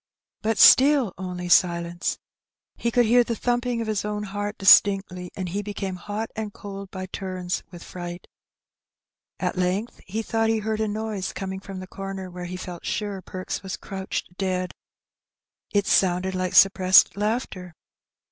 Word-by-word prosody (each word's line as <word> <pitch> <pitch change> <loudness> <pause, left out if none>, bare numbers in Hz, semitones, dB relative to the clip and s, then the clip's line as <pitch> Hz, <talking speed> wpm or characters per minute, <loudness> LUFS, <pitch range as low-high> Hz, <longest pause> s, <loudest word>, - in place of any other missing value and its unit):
But 220 0 0
still 270 -7 +7
only 180 -1 -5
silence. 170 -1 +2 0.6
He 235 - -1
could 240 +1 +3
hear 240 +2 +5
the 230 0 -3
thumping 245 +1 -1
of 225 - -4
his 215 -2 -1
own 210 0 -3
heart 205 +1 -4
distinctly, 195 -2 +5
and 185 -2 -4
he 200 +4 -2
became 195 -2 -4
hot 210 +4 -5
and 215 -1 -4
cold 200 -1 -8
by 185 -1 -6
turns 185 -1 -4
with 175 -2 -11
fright. 175 -1 -7 1.1
At 185 - -2
length 185 +6 -1
he 220 +4 -3
thought 225 0 0
he 225 - +2
heard 220 0 -2
a 220 - +1
noise 210 -2 -3
coming 190 0 -5
from 195 -1 -8
the - - -7
comer 195 -1 -6
where 180 0 -7
he 180 +1 -5
felt 180 -2 -8
sure 205 -2 -3
Perks 185 0 -5
was 190 -1 -5
crouched 190 -2 -5
dead. 185 -1 -1 1.0
It 200 -1 +2
sounded 185 0 +2
like 185 -1 -2
suppressed 190 -1 +6
laughter. 200 -5 -3
195 Hz, 160 wpm, -24 LUFS, 185-215 Hz, 1.1 s, still